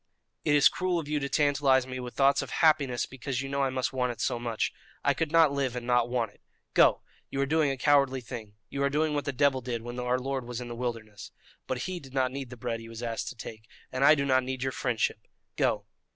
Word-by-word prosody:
"It 150 -2 +3
is 145 - +7
cruel 185 -1 0
of 160 -3 -3
you 150 0 0
to 140 -1 -3
tantalize 140 -3 +3
me 130 0 -5
with 125 -1 -7
thoughts 140 0 +4
of - - -6
happiness 145 -6 +3
because 135 0 -4
you 135 - -5
know 140 0 -1
I 135 - +2
must 130 +1 -2
want 125 -1 0
it 115 - -9
so 120 - 0
much. 115 -2 -1 0.3
I - - +3
could 160 -2 -2
not 165 -3 +6
live 135 -3 -1
and 120 -1 -4
not 120 -1 +2
want 120 -4 -1
it. - - -27 0.3
Go! - - +5 0.3
you 135 - -4
are 140 - +3
doing 155 +1 +2
a 135 - -2
cowardly 140 -1 +3
thing. 115 -4 -8
You 140 - -4
are 140 - +3
doing 150 +2 +1
what 145 -1 -1
the 145 - 0
devil 135 0 +2
did 120 -2 -4
when 120 +1 -6
our 125 0 +1
Lord 135 0 -3
was 120 0 -5
in 125 -1 -6
the 120 - -5
wilderness. 115 -4 -5 0.4
But 130 -1 -2
He 185 -1 -4
did 135 -3 -13
not 130 -1 +2
need 135 -1 -5
the 125 - -9
bread 115 -1 -3
He 115 0 -10
was 115 +1 -8
asked 115 -1 -3
to - - -9
take, 110 -1 -9 0.2
and 130 +1 -1
I 150 +2 +8
do 140 -1 0
not 130 -1 +3
need 130 0 -3
your 130 - 0
friendship. 115 -4 -1 0.3
Go!" - - +1
130 Hz, 260 wpm, -29 LUFS, 120-140 Hz, 0.4 s, I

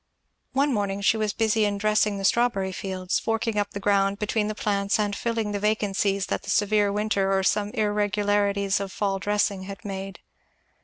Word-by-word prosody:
One 280 +1 +2
morning 200 -2 -1
she 200 - +3
was 215 -1 0
busy 220 0 +1
in 205 -1 0
dressing 210 0 +1
the 195 - -3
strawberry 200 -5 +2
beds, 185 -2 -2
forking 225 -1 -1
up 205 0 -1
the 200 - -6
ground 200 0 +2
between 210 0 -1
the 215 - -3
plants 200 -1 0
and 205 -1 -1
filling 225 -2 -2
the 205 - -2
vacancies 200 -2 0
that - - -2
the - - -10
severe 205 -1 +2
winter 200 -2 0
or 190 0 +2
some 205 +1 +1
irregularities 205 -1 +1
of 200 -1 -4
fall 195 -1 -1
dressing 205 -1 0
had 200 +2 -9
made. 195 -1 -6
205 Hz, 185 wpm, -25 LUFS, 195-215 Hz, -, she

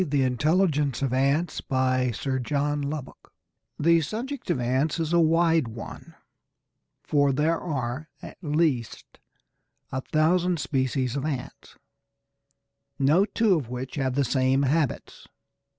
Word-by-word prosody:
THE 145 -5 +1
INTELLIGENCE 145 +1 +1
OF 130 -2 0
ANTS 140 +6 +1
By 130 -1 +1
Sir 130 +3 -2
John 145 +3 -1
Lubbock 140 -1 -6 0.5
The 165 +2 +4
subject 235 - -5
of 170 - +1
ants 130 +7 0
is 165 0 -1
a 170 - +5
wide 165 -3 +3
one, 115 0 -9 0.9
for 145 -2 +2
there 155 +4 +1
are 135 -2 -4
at - - -11
least 150 - -1 0.7
a 130 - -2
thousand 170 +4 +1
species 130 -2 -1
of 140 - -2
ants, 140 -5 -6 1.2
no 150 +8 +4
two 220 -1 +2
of 145 -9 -1
which 125 +1 -5
have 130 -3 -1
the 140 0 +2
same 130 +2 +2
habits. 145 0 -1
145 Hz, 130 wpm, -26 LUFS, 130-160 Hz, 1.2 s, a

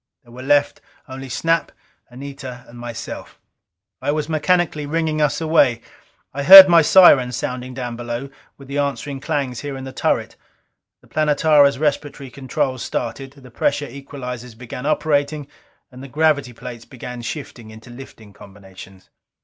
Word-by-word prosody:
There 120 - -20
were 125 +2 -10
left 145 +2 +1 0.3
only 135 0 -9
Snap, 165 +6 0 0.4
Anita 130 -1 -9
and 120 0 -13
myself. 120 -1 -8 0.6
I - - 0
was 150 0 -2
mechanically 160 -1 0
ringing 155 0 -1
us 150 -1 +1
away. 145 -7 +2 0.5
I 140 - -4
heard 190 +5 +12
my 170 -2 +6
sirens 140 -8 +5
sounding 125 0 -5
down 120 -2 -5
below, 120 +3 -6 0.3
with 140 - -14
the 140 +1 -3
answering 140 0 -3
clangs 140 -4 -3
here 145 -2 -6
in 130 - -8
the 130 0 -8
turret. - - -2 0.6
The - - -23
Planetara's 150 -2 +3
respiratory 145 -2 -3
controls 130 -1 -3
started; 125 +3 -5
the 130 -3 -16
pressure 145 - -1
equalizers 125 -3 -9
began 125 +3 -7
operating; 150 -1 -1 0.4
and 125 0 -12
the 135 - -9
gravity 145 -2 +1
plates 120 0 -10
began 125 -1 -9
shifting 120 -2 -8
into 110 +2 -13
lifting 115 -5 -13
combinations. 95 -1 -15
135 Hz, 150 wpm, -20 LUFS, 125-150 Hz, 0.6 s, heard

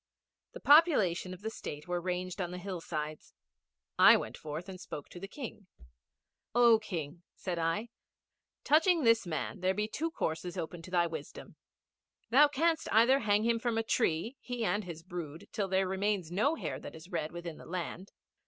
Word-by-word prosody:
The - - -8
population 280 - +5
of 185 0 -9
the 220 - -3
State 150 -7 -7
were 175 0 -1
ranged 180 +1 -3
on 175 - -2
the 180 - -6
hillsides. 165 -5 -5 0.6
I - - +9
went - - -5
forth 155 +4 -6
and 185 -2 -8
spoke 145 -5 -7
to 175 - -10
the 195 - -6
King. 220 -4 -8 0.9
'Oh 235 -2 +6
King,' 170 -6 -5
said 175 -3 -4
I. 165 +8 -1 0.7
'Touching 325 +2 +4
this 230 -4 +4
man 160 +4 -3
there 185 +1 +1
be 210 +1 0
two 320 +9 -2
courses 175 - -3
open 170 0 -5
to 175 - -11
thy 175 -1 +3
wisdom. 160 -3 -7 0.8
Thou 290 +5 +7
canst 320 +3 0
either 235 +5 +5
hang 210 -2 +2
him 230 0 +2
from 230 -1 -1
a 225 - +1
tree, 225 +2 0
he 245 -2 -3
and 210 -1 0
his 165 -2 -8
brood, 165 -3 -7
till 205 -3 -1
there 190 0 +1
remains 190 -2 -1
no 245 - +2
hair - - -4
that - - -9
is 160 +4 -12
red 155 -3 -2
within 175 -2 -7
the - - -12
land.' 180 +2 -5
185 Hz, 180 wpm, -32 LUFS, 170-225 Hz, 0.9 s, I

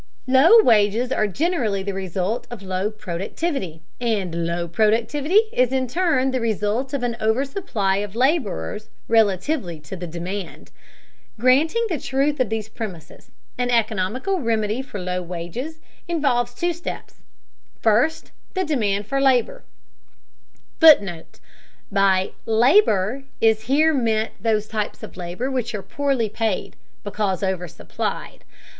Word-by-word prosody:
Low 300 - +7
wages 225 +2 +3
are 215 -5 +1
generally 230 - -1
the 200 0 -3
result 190 +4 -3
of 235 -5 -8
low 190 +2 -1
productivity, 195 - -4 0.2
and 190 -8 -1
low 170 0 -2
productivity 235 - +2
is 255 0 +2
in 260 -1 0
turn 275 -3 +1
the 255 -1 -1
result 225 +3 -1
of 265 - -3
an 240 -1 -1
oversupply 220 - 0
of 205 0 -4
laborers 230 - 0 0.2
relatively 205 - +1
to 155 - -8
the 175 -1 -6
demand. 175 +3 -6 0.7
Granting 295 - +3
the 335 -8 -2
truth 275 +4 0
of 255 -5 +1
these 220 -1 -3
premises, 205 -8 -8 0.3
an 245 0 0
economical 230 - 0
remedy 225 -2 0
for 260 -6 -7
low 180 0 -2
wages 180 - -6 0.3
involves 250 -8 0
two 345 +4 0
steps: 340 +1 -8 0.6
first, 235 +9 +1 0.2
the 375 - +1
demand 210 -10 0
for 275 +6 -1
labor 255 -4 +2 1.2
[Footnote: 200 - +5 0.5
By 195 -1 +2 0.2
"labor" 240 - +3
is 220 -1 +2
here 310 +5 +3
meant 225 -5 0
those 215 -2 +1
types 215 -1 -4
of - - -9
labor 180 +9 -4
which 240 -3 -2
are 200 - -5
poorly 275 -5 0
paid, 215 -1 -2 0.3
because 205 -2 -2
oversupplied. 180 -3 -4
225 Hz, 130 wpm, -22 LUFS, 195-265 Hz, 1.2 s, Low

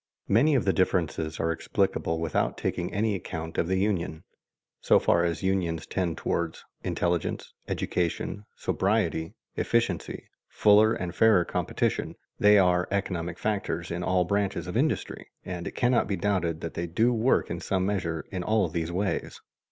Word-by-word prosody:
Many 140 +9 +4
of 125 - +1
the 95 - +3
differences 80 -4 0
are 80 0 +1
explicable 80 0 -1
without 80 -2 0
taking 85 - -2
any 105 +1 0
account 80 -4 -5
of 85 - +1
the 95 +1 +1
union. 95 -5 -1 0.6
So - - +4
far 85 - +3
as 85 0 -1
unions 90 -4 0
tend 90 -4 -2
toward 85 -1 -1 0.3
intelligence, 85 -1 -1
education, 90 +4 -2
sobriety, 80 0 0 0.2
efficiency, - - -1 0.2
fuller 105 +1 +5
and 85 -2 -4
fairer 110 -6 +4
competition, - - -1 0.2
they 105 0 +6
are 90 -2 +3
economic 90 -4 -2
factors 100 -5 -2
in 85 +1 -3
all 90 0 +2
branches 100 -2 -1
of 90 - -6
industry, 145 +6 -1 0.2
and 90 -1 -5
it - - -7
cannot 120 0 +2
be 100 - 0
doubted 85 -4 -1
that 85 - -5
they 85 +1 -3
do 115 +9 +2
work 120 +3 +2
in - - -3
some 95 -1 0
measure 90 -5 -2
in 95 -2 -3
all 105 0 +2
these 80 +1 -3
ways. 95 +3 -2
90 Hz, 160 wpm, -27 LUFS, 85-105 Hz, 0.6 s, they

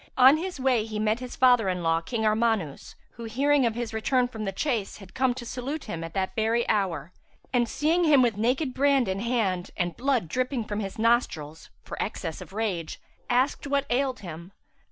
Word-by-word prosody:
On 265 +3 +8
his 355 -2 -5
way 255 -4 +2
he 215 -1 -5
met 215 +2 +1
his 250 -1 -7
father 245 -6 +4
in 180 -1 -2
law, 165 0 +2
King 220 +5 -2
Armanus 215 -8 0 0.2
who, 235 - -9
hearing 270 +3 +2
of 225 - -2
his 235 -2 -4
return 245 +3 +1
from 220 -3 -6
the 195 - -1
chase, 225 -1 -2
had 195 -3 -14
come 260 -2 +1
to 245 -2 -7
salute 265 +5 -4
him 170 -6 -5
at 165 0 -8
that 190 -1 -1
very 225 +2 +1
hour 180 -6 -1 0.4
and, 240 -2 +2
seeing 330 +4 +1
him 290 -5 +6
with 235 -4 +2
naked 255 +6 0
brand 275 -2 +3
in 190 +1 -1
hand 205 -6 -1
and 175 -2 -1
blood 255 -8 0
dripping 255 - -1
from 210 -1 -4
his 195 -2 -5
nostrils, 190 -10 0
for - - -6
excess 165 -6 -4
of - - -10
rage, 195 -6 -3 0.3
asked 255 +3 +1
what 280 0 +1
ailed 260 0 0
him. 170 0 -9
230 Hz, 200 wpm, -26 LUFS, 195-255 Hz, 0.4 s, On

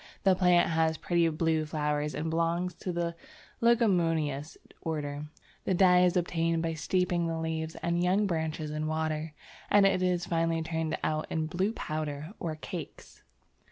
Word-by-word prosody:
The 195 - +5
plant 180 -1 +4
has 160 0 +2
pretty 170 -2 +2
blue 160 0 +1
flowers 150 -1 -1
and 160 +1 -2
belongs 170 +2 0
to 180 +2 -5
the 170 -1 -1 0.5
Leguminous 165 - +2 0.2
order. 150 -2 -3 0.4
The 190 - +1
dye 180 -1 +6
is 180 0 +3
obtained 165 -1 0
by 165 0 -1
steeping 175 +1 0
the 165 0 -2
leaves 160 0 -3
and 170 0 +1
young 190 +4 +3
branches 160 -3 -2
in 155 0 -2
water, 155 0 -2 0.4
and 205 -1 +6
it 190 -2 +3
is 180 -1 +1
finally 165 -1 0
turned 160 -1 -2
out 155 0 -1
in 160 -1 -1
blue 185 +6 0
powder 155 -3 -4
or 160 -2 -3
cakes. 155 - -8
165 Hz, 160 wpm, -29 LUFS, 155-180 Hz, 0.5 s, dye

